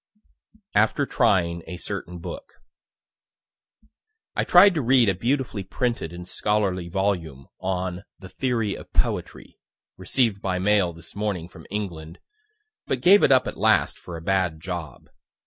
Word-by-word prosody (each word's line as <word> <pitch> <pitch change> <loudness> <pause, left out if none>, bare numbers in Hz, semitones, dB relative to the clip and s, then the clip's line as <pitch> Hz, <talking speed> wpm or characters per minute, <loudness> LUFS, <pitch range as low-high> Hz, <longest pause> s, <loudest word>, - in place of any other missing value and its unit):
AFTER 110 +7 +3
TRYING 90 -10 +1
A 90 - -6
CERTAIN 90 -2 -5
BOOK 180 - -8 1.8
I - - +1
tried 185 +2 +7
to 155 - 0
read 125 -1 +4
a - - +2
beautifully 115 +1 -1
printed 115 -3 -2
and 90 0 -9
scholarly 95 -5 -1
volume 85 -8 -2
on 95 0 -3
"the 95 - -11
Theory 115 -1 -1
of - - -10
Poetry," - - -2 0.4
received 115 -6 0
by 95 -2 -1
mail 95 -1 +2
this 85 +1 -11
morning 100 -5 -2
from - - -14
England 85 -6 -5 0.7
but 130 - -1
gave 195 +7 +7
it - - +4
up 130 -1 +5
at - - -5
last - - +2
for 85 -2 -8
a - - -9
bad 90 -4 0
job. 85 -2 -6
95 Hz, 145 wpm, -24 LUFS, 90-115 Hz, 1.8 s, tried